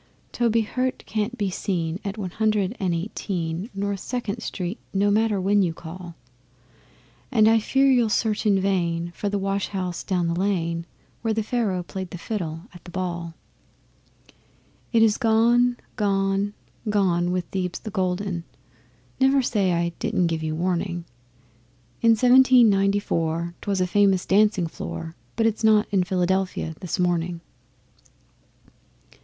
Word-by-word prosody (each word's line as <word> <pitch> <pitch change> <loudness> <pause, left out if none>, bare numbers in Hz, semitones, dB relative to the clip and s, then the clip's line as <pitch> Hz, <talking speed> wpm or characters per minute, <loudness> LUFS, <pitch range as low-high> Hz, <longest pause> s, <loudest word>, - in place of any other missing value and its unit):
Toby 230 -1 +2
Hirte 255 +4 -2
can't 220 +3 -2
be 200 -3 -1
seen 175 -2 -2
at 200 0 -4
One 190 -4 -4
Hundred 215 0 0
and 185 -3 0
Eighteen, 170 +1 -3
North 200 0 -2
Second 235 -1 -3
Street 185 0 -4 0.2
no 200 +1 +3
matter 215 -1 +2
when 200 +2 +3
you 170 -4 0
call; 170 +1 -9 1.2
And 220 -4 +5
I 225 0 +5
fear 270 +5 +2
you'll 245 -4 +4
search 215 -1 0
in 200 -2 +4
vain 175 -3 0
for 205 - -2
the 205 - -1
wash 195 0 -1
house 185 -3 -4
down 180 -3 0
the 170 - 0
lane 170 -3 -1 0.3
Where 225 -2 0
Pharaoh 215 -4 -1
played 185 +1 -6
the 180 - -7
fiddle 165 -5 -4
at 175 - -13
the - - -11
ball. 170 -2 -4 1.6
It 230 -2 +5
is 215 -2 +3
gone, 240 +2 +3 0.2
gone, 195 0 0 0.3
gone 180 -4 +2
with 180 -1 -1
Thebes 180 -2 -2
the 215 - -8
Golden 185 -2 -1 0.8
(Never 270 0 +4
say 200 -6 +1
I 170 0 +1
didn't 220 -6 +1
give 165 -1 -1
you 155 0 -2
warning). 175 0 -1 1.0
In 230 -1 +5
Seventeen 250 -1 +6
Ninety 195 +1 +2
four 170 -2 -2
'twas 200 -2 -1
a 185 - +2
famous 195 0 +3
dancing 205 -2 +3
floor 165 0 -6 0.2
But 225 - +1
it's 225 0 0
not 215 -1 +5
in 195 -3 +3
Philadelphia 185 -2 -1
this 180 - -3
morning. 175 -1 0
195 Hz, 150 wpm, -24 LUFS, 175-215 Hz, 1.6 s, Seventeen